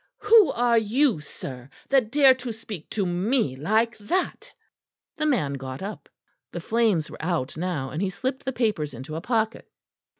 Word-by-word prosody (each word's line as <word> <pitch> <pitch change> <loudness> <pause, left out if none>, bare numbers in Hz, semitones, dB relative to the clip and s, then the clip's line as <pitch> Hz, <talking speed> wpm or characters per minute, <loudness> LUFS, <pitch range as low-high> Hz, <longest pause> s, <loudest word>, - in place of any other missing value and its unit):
"Who 435 -1 +7
are 235 -1 +3
you, 230 - +2
sir, 130 -3 -9 0.2
that 265 -5 +3
dare 275 -2 +7
to 255 -2 -6
speak 215 -6 -8
to 200 -3 -1
me 180 - 0
like 220 - +1
that?" 360 - -2 0.7
The 305 -1 0
man 190 - +1
got 135 +2 -6
up; 205 +2 -7 0.4
the - - -5
flames 220 -9 +1
were - - -9
out 165 -7 -1
now, 160 -6 -3
and 155 - -3
he 195 - +1
slipped 260 +7 -3
the 265 - -2
papers 210 - -1
into 135 +6 -7
a 160 - -4
pocket. 225 +1 -1
215 Hz, 170 wpm, -25 LUFS, 155-250 Hz, 0.7 s, Who